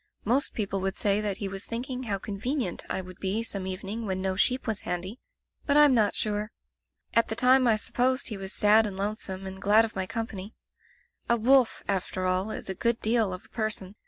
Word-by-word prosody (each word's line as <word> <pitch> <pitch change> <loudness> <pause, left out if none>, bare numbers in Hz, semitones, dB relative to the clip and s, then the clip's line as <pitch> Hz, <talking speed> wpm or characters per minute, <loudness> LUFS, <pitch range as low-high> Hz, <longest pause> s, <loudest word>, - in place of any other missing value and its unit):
Most 255 +6 +2
people 195 -3 -1
would 190 0 -2
say 205 0 +2
that 205 -2 -2
he 200 - -3
was 195 0 -5
thinking 250 +2 -4
how 210 -6 -1
convenient 205 - -3
I - - -1
would 185 -1 -12
be 200 +4 -1
some 195 -4 -3
evening 195 +4 -4
when 190 -1 -1
no 190 0 -1
sheep 255 +6 +1
was 220 -3 -1
handy, 185 +7 -4 0.5
but 285 0 +4
Fm 295 -1 +7
not 215 -4 +3
sure. 210 0 -2 0.6
At 230 - +3
the 220 - -3
time 255 +1 +4
I 225 - +5
supposed 255 +5 0
he 215 - -4
was 195 -1 -6
sad 215 +1 +5
and 195 -2 -6
lonesome, 195 -2 -4
and 190 0 -7
glad 210 +3 +5
of 225 - -9
my 190 -1 -2
company. 215 -2 -5 0.7
A 235 - +4
wolf, 250 +1 +3
after 185 -1 -1
all, 185 +3 0
is - - -5
a 190 - -2
good 235 +5 0
deal 220 -3 +1
of 185 0 -7
a - - -22
person. 215 -4 -3
210 Hz, 215 wpm, -27 LUFS, 190-230 Hz, 0.7 s, Fm